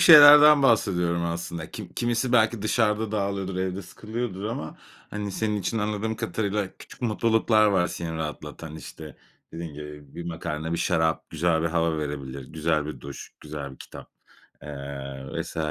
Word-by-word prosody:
şeylerden 150 -3 +10
bahsediyorum 90 -8 +2
aslında. 85 -1 -4
Kim 105 -5 -7
kimisi 120 +1 0
belki 110 -2 +3
dışarıda 110 -1 +1
dağılıyordur, 100 -2 -1
evde 95 +1 -2
sıkılıyordur 110 0 -5
ama, 105 -8 -4 0.3
hani, 105 -1 -4
senin 105 +1 0
için 105 +3 -1
anladığım 105 +1 -1
kadarıyla 105 -3 -1
küçük - - -13
mutluluklar 110 -1 +3
var 95 -4 +3
seni 85 -2 -5
rahatlatan. 80 0 -6
İşte, 80 -1 -10 0.4
dediğin 80 -2 -6
gibi 75 -1 -10
bir 85 - -6
makarna, 80 -1 -4
bir 85 - -1
şarap 80 0 +1
güzel 80 0 +1
bir - - +1
hava 80 -1 +1
verebilir. 70 -3 -5
Güzel 80 -1 0
bir 75 - -6
duş, 70 -1 -9
güzel 75 -2 -6
bir 65 - -14
kitap, - - -11 0.5
eee, 70 -2 -7
vs. - - -6
90 Hz, 155 wpm, -26 LUFS, 80-110 Hz, 0.5 s, şeylerden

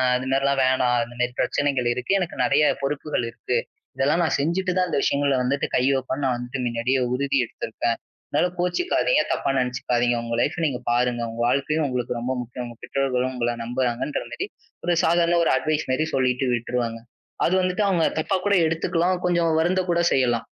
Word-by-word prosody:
அது 125 +1 -2
மாரி 135 +1 +2
எல்லாம் 140 -1 +2
வேணாம். 125 -1 +2
அந்த 120 +1 -10
மாதிரி 125 0 0
பிரச்சனைகள் 135 -4 +1
இருக்கு. 125 +9 -2
எனக்கு 180 -2 -3
நிறைய 145 +1 +3 0.2
பொறுப்புகள் 140 -2 -2
இருக்கு. 120 +1 -2 0.4
இதெல்லாம் 150 +6 +2
நான் 160 - +1
செஞ்சிட்டுதான் 180 +3 0
அந்த - - 0
விஷயங்கள 140 -1 +2
வந்துட்டு 140 +3 0
கை 125 - +2
வப்பேன்னு 130 +2 -3
நான் 125 -2 +1
வந்துட்டு 125 +2 -5
முன்னாடியே 120 +2 0
உறுதி 140 +1 0
எடுத்துருக்கேன். 115 +1 -3 0.3
அதனால 155 +5 +2
கோச்சுக்காதீங்க. 360 - +2
தப்பா - - -1
நினைச்சுக்காதீங்க. 125 -1 0
உங்க 115 0 -4
லைப் - - 0
நீங்க 135 -5 -1
பாருங்க. 120 0 +1
உங்க 115 +1 -5
வாழ்க்கையும் 145 +4 +1
உங்களுக்கு 125 -1 -2
ரொம்ப 125 +2 -2
முக்கியம். 125 +1 -6
உங்க 120 -1 -11
பெற்றோர்களும் 130 -2 0
உங்களை 120 -1 0
நம்பறாங்கன்ற 125 +3 -1
மாதிரி 390 - -3 0.4
ஒரு 175 -1 +2
சாதாரண 170 +1 +3
ஒரு - - +2
அட்வைஸ் 155 +2 -1
மாதிரி 155 +5 +1
சொல்லிட்டு 130 0 +1
விட்டுருவேங்க. 120 -1 -2 0.5
அது 175 - +1
வந்துட்டு 185 +3 0
அவங்க 175 -4 +2 0.2
தப்பாக்கூட 190 +4 0
எடுத்துக்கலாம். 170 +2 0
கொஞ்சம் 170 -2 +2
வருந்தக்கூட 175 0 +1
செய்யலாம். 120 -3 +1
135 Hz, 170 wpm, -24 LUFS, 125-165 Hz, 0.5 s, நிறைய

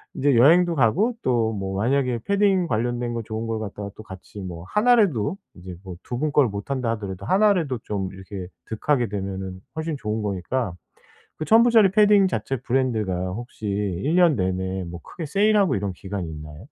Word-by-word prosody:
이제 140 -2 +2
여행도 170 +8 +5
가고 165 - +2
또 115 -3 +1
뭐 95 -1 -4
만약에 125 +2 +1
패딩 195 -3 +2
관련된 120 +1 -1
거 115 - -3
좋은 110 +1 -5
걸 115 -1 -2
갖다가 100 -1 -6
또 110 - -9
같이 95 +1 -11
뭐 85 -3 -7
1 245 +4 +5
라도 170 - +1 0.2
이제 90 0 -9
뭐 95 -2 -8
2 120 - -5
분 150 +1 0
걸 145 -4 +5
못 100 +3 -7
한다 125 -4 0
하더라도 100 -4 -5
1 205 - +4
라도 140 - -2
좀 95 -3 -3
이렇게 95 -1 -8 0.2
득하게 120 +3 0
되면은 95 -2 -5
훨씬 160 -1 -3
좋은 110 -3 -3
거니까. 100 +2 -2 0.6
그 155 - -4
1,000 225 +1 +6
불짜리 225 -5 +5
패딩 205 -1 +5
자체 135 -6 -2
브랜드가 120 -7 0 0.2
혹시 115 +1 -8
1 100 - -1
년 175 -5 +5
내내 95 -1 -2
뭐 85 0 -8
크게 165 - -8
세일하고 200 - +3
이런 100 0 -2
기간이 95 -2 -5
있나요? 75 -1 -9
115 Hz, 335 characters per minute, -23 LUFS, 95-155 Hz, 0.6 s, 1,000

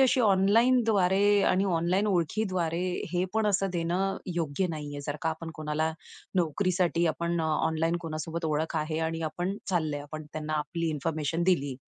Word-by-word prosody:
अशी 260 -1 +4
ऑनलाईनद्वारे 205 -1 +4
आणि 190 +2 +2
ऑनलाईन 180 +3 +1
ओळखीद्वारे 180 -2 0 0.3
हे 180 +1 +1
पण 220 -1 +2
असं 195 -2 +1
देणं 180 +3 0 0.2
योग्य 165 +2 0
नाहीये. 145 -2 -5
जर 145 - -2
का 160 - +1
आपण 165 +1 -6
कोणाला 155 +1 -1 0.4
नोकरीसाठी 175 0 +1
आपण 170 +1 -1
ऑनलाईन 160 +1 +1
कोणासोबत 165 +1 -4
ओळख 160 +2 -1
आहे 155 +1 -1
आणि 165 0 -4
आपण 185 +4 -3
चाललोय. 155 -5 0
आपण 155 +2 -7
त्यांना 155 0 -4
आपली 165 +2 -2
इन्फॉर्मेशन 155 +2 -1
दिली 145 -7 +2
170 Hz, 145 wpm, -28 LUFS, 155-190 Hz, 0.4 s, अशी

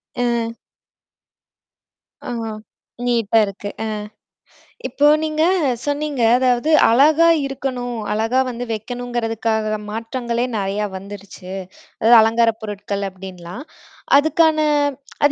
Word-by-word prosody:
அ. 235 -2 0 1.8
ஆ - - -4 0.8
நீட்டா 230 -2 +1
இருக்கு 200 +1 -7
அ, - - -2 1.0
இப்போ 290 - +2 0.2
நீங்க 310 0 -1 0.4
சொன்னீங்க, 290 -2 -2 0.2
அதாவது, 255 +4 +1 0.2
அழகா 310 +7 +5 0.2
இருக்கணும், 255 -3 -4
அழகா 225 +5 +1
வந்து 245 0 -4
வைக்கணுமங்கறதுக்காக 225 -1 -2
மாற்றங்களே 235 +2 -3
நெறைய 200 +1 -1
வந்துருச்சு. 195 -1 -10 0.5
அதாவது 230 +1 +7
அலங்கார 230 +1 +3
பொருட்கள், 205 -1 -4
அப்படின்னுலாம். 185 +3 -9 0.5
அதுக்கான 315 +1 +3 0.7
அத 290 - +4
235 Hz, 90 wpm, -20 LUFS, 210-260 Hz, 1.8 s, அதாவது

